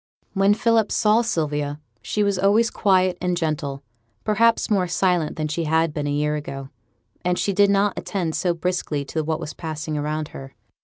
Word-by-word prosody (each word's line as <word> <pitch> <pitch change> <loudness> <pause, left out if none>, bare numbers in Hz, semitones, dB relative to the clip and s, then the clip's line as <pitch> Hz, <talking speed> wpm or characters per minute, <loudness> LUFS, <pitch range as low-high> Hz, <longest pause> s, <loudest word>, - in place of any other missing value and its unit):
When 195 +1 +3
Philip 225 -2 +2
saw 215 +2 +3
Sylvia 150 -8 -2 0.2
she 210 - -1
was 200 -2 +1
always 215 +5 +3
quiet 185 -3 +2
and 180 -1 0
gentle; 150 -4 -2 0.4
perhaps 230 +2 +3
more 190 -3 +2
silent 175 -3 +1
than 155 -1 -2
she 160 +2 -2
had 160 0 +2
been 145 -1 -2
a - - -1
year 150 +1 0
ago, 135 -2 -6 0.5
and 180 0 +1
she 200 - 0
did 200 +1 +4
not 200 0 +3
attend 175 -6 -2
so 175 0 0
briskly 165 -4 -2
to 160 +3 -2
what 155 0 -1
was 150 - -6
passing 155 -2 -4
around 150 +1 -2
her. 135 0 -10
170 Hz, 185 wpm, -23 LUFS, 150-200 Hz, 0.5 s, did